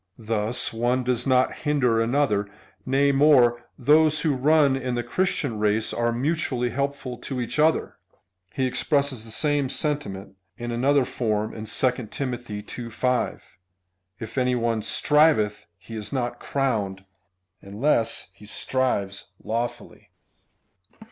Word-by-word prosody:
^ -, -, -51 dB, 0.2 s
Thus 110 Hz, +2 st, 0 dB
one 120 Hz, +3 st, 0 dB
does 125 Hz, 0 st, 0 dB
not 130 Hz, -1 st, +2 dB
hinder 125 Hz, -6 st, +1 dB
another: 115 Hz, -5 st, +1 dB, 0.4 s
nay 140 Hz, +2 st, +3 dB
more, 130 Hz, -4 st, +4 dB
those 155 Hz, +3 st, +4 dB
who 155 Hz, -3 st, +2 dB
run 145 Hz, +1 st, +4 dB
in 130 Hz, -2 st, -2 dB
the 120 Hz, -, -1 dB
Christian 135 Hz, -, -1 dB
race 105 Hz, +1 st, +1 dB
are 120 Hz, 0 st, 0 dB
mutually 125 Hz, -2 st, -1 dB
helpful 140 Hz, -1 st, -3 dB
to 135 Hz, -2 st, -5 dB
each 125 Hz, +4 st, -3 dB
other. 160 Hz, +1 st, +2 dB, 0.5 s
He 130 Hz, -, -1 dB
expresses 140 Hz, -2 st, 0 dB
the 115 Hz, -, -11 dB
same 145 Hz, +3 st, 0 dB
sentiment 105 Hz, -, -3 dB, 0.2 s
in 120 Hz, -1 st, -5 dB
another 135 Hz, +3 st, +2 dB
form 110 Hz, -3 st, -2 dB
in 110 Hz, -, -7 dB
2 125 Hz, +4 st, +2 dB, 0.2 s
Tim. 130 Hz, -3 st, -3 dB
ii. 110 Hz, -4 st, -6 dB, 0.3 s
5, 125 Hz, +2 st, -1 dB, 0.8 s
If 110 Hz, +4 st, -4 dB
any 125 Hz, 0 st, +2 dB
one 115 Hz, -2 st, 0 dB
striveth, 150 Hz, -, +2 dB
he 100 Hz, +5 st, -10 dB
is 105 Hz, -2 st, -6 dB
not 120 Hz, -2 st, -2 dB
crowned, 105 Hz, -8 st, -2 dB, 0.6 s
unless 110 Hz, -1 st, -1 dB
he 105 Hz, +1 st, -15 dB
strives 105 Hz, -5 st, -1 dB, 0.2 s
lawfully. 115 Hz, +2 st, -4 dB
125 Hz, 135 wpm, -24 LUFS, 110-140 Hz, 0.8 s, more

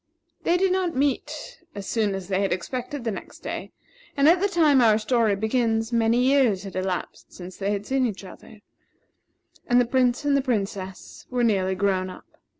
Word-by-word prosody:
They 345 Hz, -, +2 dB
did 380 Hz, 0 st, +2 dB
not 365 Hz, -2 st, 0 dB
meet 275 Hz, +1 st, -2 dB
as 200 Hz, -1 st, -6 dB
soon 210 Hz, -3 st, 0 dB
as 190 Hz, -2 st, -6 dB
they 190 Hz, 0 st, 0 dB
had 195 Hz, -, 0 dB
expected 250 Hz, -, -4 dB
the 230 Hz, -, -1 dB
next 195 Hz, -, -9 dB
day; -, -, -5 dB, 0.5 s
and 280 Hz, +1 st, +4 dB
at 345 Hz, +3 st, +5 dB
the 400 Hz, -, +3 dB
time 310 Hz, -8 st, +4 dB
our 220 Hz, -3 st, +5 dB
story 220 Hz, -1 st, +1 dB
begins, 225 Hz, +1 st, 0 dB
many 230 Hz, 0 st, +3 dB
years 255 Hz, -8 st, +3 dB
had 195 Hz, -2 st, -8 dB
elapsed 185 Hz, -1 st, -4 dB
since 180 Hz, 0 st, -10 dB
they 200 Hz, 0 st, -2 dB
had 205 Hz, 0 st, -2 dB
seen 265 Hz, 0 st, +1 dB
each 205 Hz, -3 st, -6 dB
other, 205 Hz, +2 st, -13 dB, 1.1 s
and 245 Hz, 0 st, +4 dB
the 245 Hz, -, +3 dB
Prince 250 Hz, +2 st, +1 dB
and 285 Hz, -1 st, +3 dB
the 275 Hz, -, +3 dB
Princess 195 Hz, -6 st, -4 dB
were 250 Hz, -1 st, 0 dB
nearly 190 Hz, -4 st, +1 dB
grown 185 Hz, -1 st, 0 dB
up. 185 Hz, -, -11 dB
225 Hz, 190 wpm, -24 LUFS, 195-265 Hz, 1.1 s, at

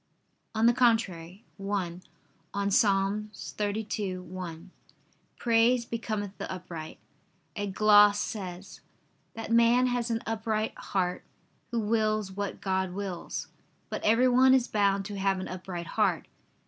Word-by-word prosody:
On 220 Hz, +1 st, +2 dB
the 240 Hz, -, +6 dB
contrary, 210 Hz, -6 st, +1 dB
(1) 195 Hz, -3 st, -3 dB, 0.5 s
On 200 Hz, 0 st, 0 dB
Ps. 215 Hz, +7 st, +5 dB
32:1, 195 Hz, -3 st, -3 dB, 0.7 s
"Praise 235 Hz, +1 st, +3 dB
becometh 215 Hz, -4 st, -4 dB
the -, -, -5 dB
upright," 170 Hz, -4 st, -7 dB, 0.6 s
a 205 Hz, -1 st, -2 dB
gloss 205 Hz, +1 st, +6 dB
says: 190 Hz, -3 st, -6 dB, 0.5 s
"That 225 Hz, 0 st, -6 dB
man 235 Hz, +2 st, +5 dB
has 245 Hz, -1 st, 0 dB
an 230 Hz, 0 st, -1 dB
upright 220 Hz, -1 st, -1 dB
heart, 180 Hz, -2 st, -2 dB, 0.5 s
who 235 Hz, -, -1 dB
wills 215 Hz, -2 st, 0 dB
what 200 Hz, +1 st, -4 dB
God 190 Hz, -1 st, -1 dB
wills." 190 Hz, -3 st, -5 dB, 0.4 s
But -, -, -3 dB
everyone 255 Hz, +3 st, +5 dB
is 255 Hz, -2 st, +2 dB
bound 200 Hz, -2 st, +1 dB
to 200 Hz, -1 st, -5 dB
have 195 Hz, -1 st, +1 dB
an 185 Hz, -, -5 dB
upright 180 Hz, -1 st, -6 dB
heart. -, -, 0 dB
205 Hz, 120 wpm, -28 LUFS, 190-225 Hz, 0.7 s, the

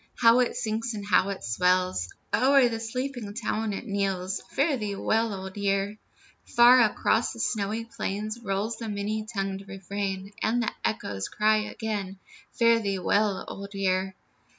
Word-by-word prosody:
How 230 Hz, +1 st, +6 dB
it 250 Hz, -, +1 dB
sinks 230 Hz, -1 st, -2 dB
and 205 Hz, -1 st, -6 dB
how 195 Hz, 0 st, +3 dB
it 195 Hz, -, -5 dB
swells! 180 Hz, -, +1 dB, 0.2 s
O'er 265 Hz, +1 st, +5 dB
the 225 Hz, -1 st, -3 dB
sleeping 240 Hz, -2 st, -4 dB
town 220 Hz, -1 st, -1 dB
it 200 Hz, -, -5 dB
knells, 195 Hz, -3 st, -1 dB
"Fare 285 Hz, +1 st, +1 dB
thee 210 Hz, -5 st, -3 dB
well, 225 Hz, +3 st, +1 dB
Old 190 Hz, -1 st, -6 dB
Year." 200 Hz, +1 st, 0 dB, 0.4 s
Far 245 Hz, +1 st, +6 dB
across 225 Hz, +1 st, +2 dB
the -, -, -10 dB
snowy 220 Hz, +1 st, -1 dB
plain 215 Hz, -1 st, -4 dB
Rolls 205 Hz, +2 st, -2 dB
the 225 Hz, -2 st, -5 dB
many 210 Hz, +1 st, -3 dB
tongued 195 Hz, -2 st, -3 dB
refrain, 195 Hz, 0 st, -4 dB
And 235 Hz, +2 st, +1 dB
the 220 Hz, -, -1 dB
echoes 100 Hz, -, -2 dB
cry 215 Hz, +1 st, +3 dB
again, 210 Hz, -3 st, -3 dB, 0.3 s
"Fare 230 Hz, -1 st, +4 dB
thee 200 Hz, -3 st, -1 dB
well, 200 Hz, +2 st, +1 dB
Old 200 Hz, 0 st, -8 dB
Year." 190 Hz, -1 st, 0 dB
210 Hz, 155 wpm, -27 LUFS, 195-230 Hz, 0.4 s, How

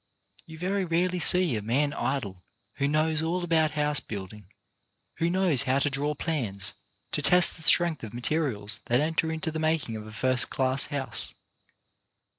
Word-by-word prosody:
You 160 Hz, -1 st, -11 dB
very 190 Hz, +4 st, -1 dB
rarely 180 Hz, +1 st, 0 dB
see 175 Hz, -3 st, +5 dB
a 105 Hz, -, -3 dB
man 140 Hz, +7 st, 0 dB
idle 120 Hz, -9 st, -3 dB, 0.4 s
who 140 Hz, -, 0 dB
knows 155 Hz, +1 st, +1 dB
all 175 Hz, +3 st, -2 dB
about 160 Hz, -2 st, +2 dB
house 150 Hz, -1 st, +2 dB
building, 100 Hz, -1 st, -9 dB, 0.7 s
who 165 Hz, -, 0 dB
knows 180 Hz, -7 st, +2 dB
how 135 Hz, -1 st, 0 dB
to 140 Hz, +1 st, 0 dB
draw 145 Hz, +2 st, -2 dB
plans, 115 Hz, -, -2 dB, 0.4 s
to -, -, -2 dB
test 180 Hz, 0 st, +4 dB
the -, -, -15 dB
strength 165 Hz, -3 st, +3 dB
of 110 Hz, -, -7 dB
materials 120 Hz, -4 st, -1 dB
that 120 Hz, +1 st, +2 dB
enter 160 Hz, +1 st, 0 dB
into 160 Hz, +1 st, -3 dB
the 160 Hz, -, -4 dB
making 155 Hz, -7 st, -1 dB
of 110 Hz, 0 st, -8 dB
a -, -, -10 dB
first 130 Hz, +4 st, +1 dB
class 130 Hz, 0 st, +1 dB
house. 140 Hz, -2 st, -2 dB
150 Hz, 170 wpm, -27 LUFS, 120-165 Hz, 0.7 s, see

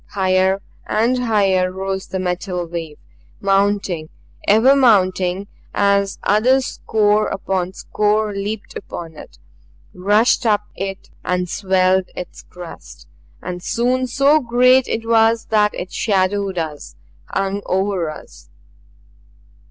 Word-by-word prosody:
Higher 190 Hz, 0 st, +1 dB, 0.2 s
and 245 Hz, +3 st, +1 dB
higher 195 Hz, -5 st, +2 dB
arose 190 Hz, 0 st, -4 dB
the 190 Hz, -, -4 dB
metal 180 Hz, 0 st, -2 dB
wave 165 Hz, -3 st, -6 dB, 0.4 s
mounting, 195 Hz, -4 st, 0 dB, 0.4 s
ever 225 Hz, +7 st, +5 dB
mounting 190 Hz, -6 st, +3 dB, 0.3 s
as 200 Hz, -1 st, +2 dB
other 245 Hz, +6 st, +3 dB
score 215 Hz, -4 st, +1 dB
upon 190 Hz, -2 st, -2 dB
score 210 Hz, +1 st, 0 dB
leaped 200 Hz, +1 st, -5 dB
upon 165 Hz, -4 st, -8 dB
it, 65 Hz, -, -13 dB, 0.6 s
rushed 205 Hz, +8 st, +2 dB
up 210 Hz, -3 st, +2 dB
it 195 Hz, 0 st, -6 dB
and 180 Hz, 0 st, -1 dB
swelled 185 Hz, 0 st, +1 dB
its 180 Hz, -, -8 dB
crest. 175 Hz, -2 st, -12 dB, 0.4 s
And 180 Hz, 0 st, -5 dB
soon 250 Hz, +6 st, 0 dB
so 280 Hz, +4 st, +3 dB
great 250 Hz, 0 st, +4 dB
it 225 Hz, 0 st, -3 dB
was 225 Hz, 0 st, +3 dB
that 210 Hz, -1 st, +3 dB
it 180 Hz, -, -6 dB
shadowed 195 Hz, -2 st, 0 dB
us, 155 Hz, -, -5 dB, 0.3 s
hung 195 Hz, -, -2 dB
over 190 Hz, -3 st, 0 dB
us. -, -, -12 dB
195 Hz, 115 wpm, -19 LUFS, 185-220 Hz, 0.6 s, ever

